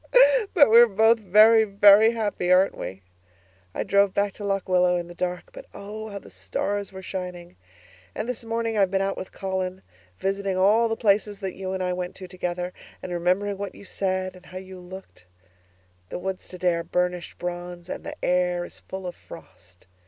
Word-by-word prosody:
But 285 -10 +6
we're 235 +1 +9
both 225 +2 +4
very, 215 +3 +6
very 205 +1 +6
happy, 205 -5 -1
aren't 185 +2 +4
we? 95 +1 -7 0.7
I - - -1
drove 200 -1 +2
back 200 -1 +1
to 210 - -10
Lock 195 -1 -1
Willow 180 -1 +3
in 175 -1 -3
the 175 - -10
dark 180 +1 -4
but - - -11
oh, 215 +2 -7
how 200 - -6
the - - -12
stars 200 -1 -3
were 190 0 -10
shining! 180 -2 -6 0.6
And - - -3
this 245 -2 -4
morning 230 0 -2
I've 195 -2 +4
been 195 +1 0
out 195 0 -1
with 185 - -7
Colin 190 -1 -4 0.3
visiting 195 -1 -2
all 215 +5 +4
the 225 - 0
places 205 -1 +1
that 190 -2 -3
you 190 0 -5
and 190 -1 -2
I 180 0 -1
went 180 0 -5
to 185 - -9
together, 180 0 -4 0.3
and 180 - -6
remembering 185 +3 0
what 200 -2 -5
you - - -13
said 185 -1 -2
and 180 0 -16
how 185 - -9
you 185 0 -9
looked. 180 - -12 0.8
The - - -4
woods 190 +1 -5
today 180 -1 0
are 170 0 -2
burnished 180 0 -2
bronze 175 0 -6
and - - -6
the - - -6
air 180 -1 +1
is - - -11
full 190 0 -8
of 180 - -4
frost. 90 0 -15
190 Hz, 195 wpm, -25 LUFS, 180-200 Hz, 0.8 s, we're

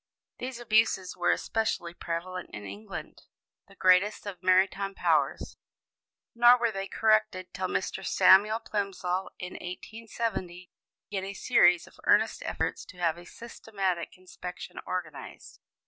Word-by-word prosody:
These 255 -1 -5
abuses 215 -5 +2
were - - 0
especially 220 -6 -1
prevalent 175 +2 -5
in 105 - -8
England, 100 +2 -8 0.5
the - - -18
greatest 185 +4 +3
of 190 -4 -7
maritime 195 +1 +2
powers; - - 0 0.8
nor 240 +1 +7
were 235 -2 +1
they 195 -1 -4
corrected 215 -5 +1
till 185 -1 -2
Mr. 185 - -2
Samuel 210 +4 +5
Plimsoll, 190 -4 -2
in 180 0 -7
1870, 185 -2 -5 0.4
began 195 -2 -2
a 195 +1 -6
series 175 -5 +4
of - - -19
earnest - - +3
efforts - - -2
to 185 - -14
have 170 -1 0
a 175 - -13
systematic 195 -7 -4
inspection 180 -1 -9
organized. 170 -5 -6
190 Hz, 130 wpm, -28 LUFS, 180-215 Hz, 0.8 s, nor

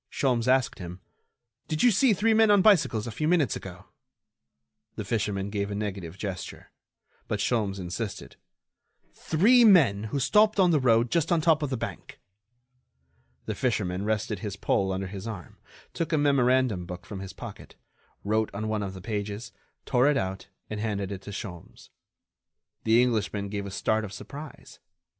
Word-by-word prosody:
Sholmes 125 -3 0
asked 130 -1 +2
him: 90 0 -7 0.7
"Did 155 0 -1
you 245 - +6
see 225 +3 +4
three 220 +3 +2
men 220 0 +5
on 205 -2 +5
bicycles 165 - +4
a 115 - -5
few 155 +8 -2
minutes 160 - +2
ago?" 95 +1 -9 1.1
The 110 - -5
fisherman 100 -2 -2
made 100 -1 -1
a 100 - -4
negative 100 -4 -5
gesture. 95 -3 -6 0.6
But 105 -3 -2
Sholmes 100 -3 0
insisted: 95 +4 -5 0.8
"Three 230 +10 +4
men 145 - +5
who 140 +6 -2
stopped 210 - +3
on 180 -2 +5
the 155 - +3
road 120 -2 +3
just 165 -1 +1
on 170 - +4
top 160 -1 +3
of 145 - -1
the 130 - -2
bank?" - - -7 1.3
The 110 - -2
fisherman 100 -5 -1
rested 105 -1 -1
his 100 0 -5
pole 95 -1 0
under 95 +1 -2
his 95 +2 -7
arm, 105 -6 -8 0.3
took 165 - -3
a 155 - +2
memorandum 130 -9 +2
book 90 -1 -8
from 100 - -7
his 95 -1 -8
pocket, - - -10 0.5
wrote 110 +1 +1
on 110 +2 -3
one 110 -1 -1
of 95 -1 -5
the 95 - -9
pages, 105 +3 -4 0.3
tore 125 +1 +3
it 145 - +2
out, 95 0 -3 0.2
and 105 - -5
handed 100 -3 -2
it 95 -2 -6
to 100 - -10
Sholmes. 95 -4 -9 1.0
The 115 +1 +5
Englishman 105 -4 -1
gave 100 -1 -4
a - - -5
start 110 +3 0
of 100 -2 -7
surprise. 145 +7 -10
110 Hz, 170 wpm, -27 LUFS, 100-140 Hz, 1.3 s, you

